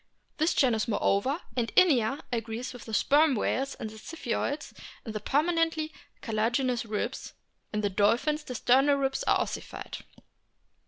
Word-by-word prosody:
This 320 +2 +2
genus 240 -4 +2
moreover, 230 - +1
and 235 -2 -1
Inia, 275 - +4
agrees 230 +2 -3
with 245 - -10
the 225 - -8
Sperm 295 -1 +4
whales 270 +5 -1
and - - -5
the 220 - -11
Ziphioids 285 +1 -3 0.3
in 225 - -5
the 215 - -3
permanently 320 +5 +1 0.3
carti 225 - -5
laginous 240 +3 +1
ribs; 210 - -3 0.4
in 210 - -1
the 205 - +1
dolphins 240 - +2
the 250 - -7
sternal 270 +5 +4
ribs 270 0 0
are - - +3
ossified. - - -5
255 Hz, 150 wpm, -28 LUFS, 225-295 Hz, 0.4 s, Inia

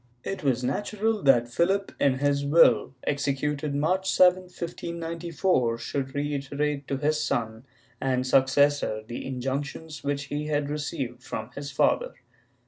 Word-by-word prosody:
^ - - -40 0.2
It 195 - -4
was 130 -3 +1
natural 210 - -1
that 135 -4 +5
Phihp, 185 +11 0
in 135 -2 +3
his 140 +1 +1
will, 140 -5 +4
executed 145 +1 -1
March 185 +6 +1
7, 185 0 +5
1594, 170 -6 -2
should 135 +2 -4
reiterate 145 0 -2
to 140 - -1
his 150 +2 +1
son 110 +1 -2 0.4
and 130 -1 0
successor 135 -3 +3
the 120 +2 -6
injunctions 140 +4 -4
which 140 0 -1
he 145 +2 -4
had 145 -1 -1
received 145 -5 -4
from 110 -1 -6
his 140 +1 -6
father. - - +1
145 Hz, 135 wpm, -26 LUFS, 130-160 Hz, 0.4 s, that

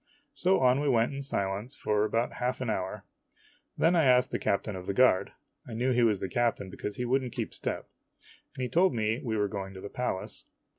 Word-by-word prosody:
So 185 -2 +2
on 130 +1 +4
we 145 0 +1
went 120 +1 +2
in 140 - -4
silence 105 -2 -2
for 105 0 +1
about 115 +2 0
half 125 +1 -2
an 125 -4 -1
o - - +2
hour. 95 -1 -4 0.7
Then 170 +2 +4
I 165 -3 +4
asked 125 0 +4
the - - -1
captain 100 +1 -1
of 90 -1 -8
the 100 - -2
guard, 125 -6 +4 0.4
I 120 - -7
knew 125 +3 +1
he 125 -1 +3
was 110 -4 +3
the - - -3
captain 115 -5 0
because 105 +2 -5
he 125 - -3
would 130 +3 +2
n't 125 -3 -6
keep - - -4
step, - - -4 0.7
and 130 - -4
he - - 0
told 170 +3 +3
me 110 +1 0
we 110 -3 -1
were 105 -1 +2
going 95 -1 -6
to - - -8
the 100 - -7
Palace. 125 -6 -4
120 Hz, 235 wpm, -29 LUFS, 100-130 Hz, 0.7 s, on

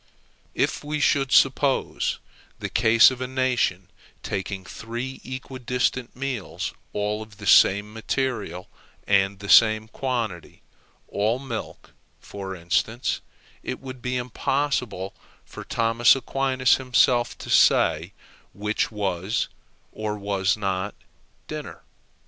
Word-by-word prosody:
If - - 0
we 150 +1 -3
should 135 -2 +2
suppose 135 0 +2 0.4
the - - -5
case 115 +3 +6
of 130 -1 -7
a 130 - -2
nation 125 -8 0 0.4
taking 95 0 -4
three 120 +9 -6
equidistant 130 -1 -3
meals 130 -5 -4 0.2
all 105 +1 -2
of 110 -2 -11
the 105 - -9
same 105 +2 +5
material 110 -6 -3 0.4
and 100 0 +2
the 100 +1 -9
same 110 0 +6
quantity, 115 -8 -4 0.4
all 110 +4 0
milk, 130 -4 -7 0.3
for 95 -1 -7
instance, 100 +7 -1 0.4
it 130 - -5
would 130 -2 -9
be 125 +1 -2
impossible 125 -5 -1 0.3
for - - -9
Thomas 115 +2 +3
Aquinas 135 -1 +2
himself 125 -1 +2
to - - -7
say - - +4 0.4
which 105 +2 -1
was 100 +1 -1 0.4
or 105 -1 -4
was 100 -1 0
not 95 -1 -2 0.5
dinner. - - -7
115 Hz, 115 wpm, -24 LUFS, 100-130 Hz, 0.5 s, case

